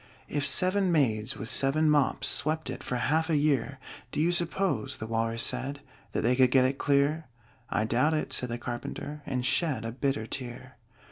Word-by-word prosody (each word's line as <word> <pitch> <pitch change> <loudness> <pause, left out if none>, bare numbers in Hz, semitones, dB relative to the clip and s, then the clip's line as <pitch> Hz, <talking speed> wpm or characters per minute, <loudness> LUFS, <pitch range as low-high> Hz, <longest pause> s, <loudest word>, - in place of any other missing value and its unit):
"If 145 -1 -1
seven 185 +7 +3
maids 110 -9 +1
with 110 - -6
seven 140 +6 +2
mops 150 -3 +2
Swept 155 -2 +1
it 125 - -7
for 125 - -3
half 155 +7 +1
a 155 - +3
year, 140 -2 +1 0.3
Do - - -3
you 165 +3 +3
suppose," 175 - 0
the 110 - -6
Walrus 115 +1 -1
said, 140 +2 -1 0.3
"That - - 0
they 125 +3 +2
could 130 -1 +5
get 130 0 +4
it 135 +1 -1
clear?" 145 +3 +1 0.4
"I 105 - 0
doubt 130 +8 +2
it," 155 - -3
said 125 - -1
the 120 - -3
Carpenter, 125 +4 -6
And 125 -2 -2
shed 135 -5 0
a 115 - -3
bitter 130 -2 -1
tear. 125 +1 -7
135 Hz, 190 wpm, -28 LUFS, 120-155 Hz, 0.4 s, could